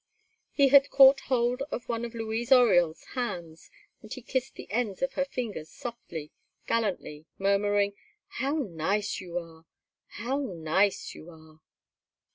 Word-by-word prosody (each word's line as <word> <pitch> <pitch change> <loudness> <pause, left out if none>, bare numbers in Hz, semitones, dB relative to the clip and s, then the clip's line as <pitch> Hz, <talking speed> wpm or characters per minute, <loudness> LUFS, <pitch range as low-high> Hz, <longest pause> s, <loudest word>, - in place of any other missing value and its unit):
He 280 -2 +4
had 280 +1 +7
caught 270 0 +7
hold 250 0 +1
of 245 - -5
one 230 -1 -2
of 235 0 -8
Louise 225 +2 -3
Oriol's 180 -11 +5
hands, 175 -10 -5 0.3
and 215 - -14
he 255 - -7
kissed 260 +1 -2
the - - -9
ends 220 -1 -1
of 270 0 -1
her 275 - 0
fingers 225 - -5
softly, 235 - -8 0.3
gallantly, 185 -8 -2
murmuring: 200 +1 +2 0.3
"How 275 +3 -2
nice 200 - -1
you 175 -2 -6
are! 165 -1 -8 0.4
How 255 +5 -3
nice 190 - 0
you 165 - -12
are!" 160 -1 -17
215 Hz, 140 wpm, -28 LUFS, 175-250 Hz, 0.4 s, had